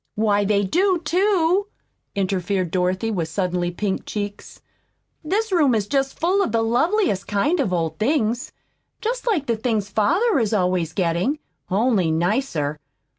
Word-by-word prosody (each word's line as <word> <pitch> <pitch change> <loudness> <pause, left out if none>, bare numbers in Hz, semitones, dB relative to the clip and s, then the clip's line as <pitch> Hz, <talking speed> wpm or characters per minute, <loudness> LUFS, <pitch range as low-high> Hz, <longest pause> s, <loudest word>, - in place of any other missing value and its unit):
"Why, 210 -1 +2
they 200 0 +2
do, 365 - +2
too," 370 +2 +2 0.5
interfered 190 -2 -1
Dorothy, 185 +4 0
with 175 -6 -1
suddenly 180 0 -1
pink 190 +2 -3
cheeks. 205 -1 -5 0.6
"This 410 +7 -1
room 295 -9 +3
is 210 -2 0
just 270 +4 -1
full 370 +4 +2
of 315 - 0
the 225 0 +1
loveliest 245 - +1
kind 285 - +1
of 240 -10 0
old 165 -3 -1
things, 235 -1 0 0.5
just - - -3
like 360 - +1
the 235 - 0
things 220 -3 -1
father 350 - +2
is 220 -2 +1
always 180 -4 0
getting 180 - 0 0.3
only 200 -3 +2
nicer. 160 - 0
215 Hz, 145 wpm, -22 LUFS, 185-310 Hz, 0.6 s, room